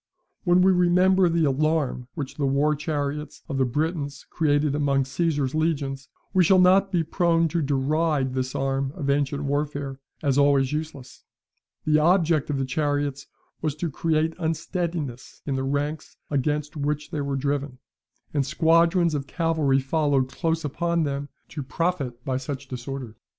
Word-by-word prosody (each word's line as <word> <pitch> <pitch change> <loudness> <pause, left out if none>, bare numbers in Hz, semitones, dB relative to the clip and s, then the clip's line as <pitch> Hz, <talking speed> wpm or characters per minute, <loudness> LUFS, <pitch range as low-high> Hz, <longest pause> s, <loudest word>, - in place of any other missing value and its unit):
When 180 0 +5
we 190 - +6
remember 180 +1 +4
the 165 -1 +2
alarm 145 -3 0
which 145 -5 -4
the 140 -2 +1
war 140 +3 +2
chariots 150 -1 -3
of 140 -4 -3
the 130 - +3
Britons 145 +1 -2
created 145 -2 +2
among 140 -2 +1
Caesar's 145 -1 -1
legions, 140 -4 -1 0.2
we 185 -2 +5
shall 185 +3 +5
not 190 +2 +5
be 175 -3 +2
prone 165 0 +2
to 170 +2 0
deride 145 0 +1
this 130 0 -2
arm 135 0 -1
of 140 -6 -1
ancient 140 0 0
warfare 145 -1 -2 0.2
as 140 -1 +2
always 140 -1 +3
useless. 150 -4 -6 0.6
The 155 0 +4
object 165 -2 +3
of 145 - 0
the 135 - 0
chariots 145 0 -1 0.3
was 155 -2 -1
to 160 +1 -3
create 160 +2 0
unsteadiness 165 -5 -3
in 140 - -1
the 135 - -1
ranks 145 +3 -3
against 150 +2 -1
which 150 0 -2
they 150 - -2
were 140 -1 -2
driven, 140 -1 -2 0.6
and 145 -2 +2
squadrons 165 +3 +3
of 140 -2 -3
cavalry 160 -5 +1
followed 135 -1 +1
close 160 +3 -1
upon 170 +3 0
them, 140 -1 -3 0.2
to 150 - -5
profit 135 -3 -2
by 130 -1 0
such 135 +1 -5
disorder. 130 -2 -6
145 Hz, 155 wpm, -25 LUFS, 135-165 Hz, 0.6 s, we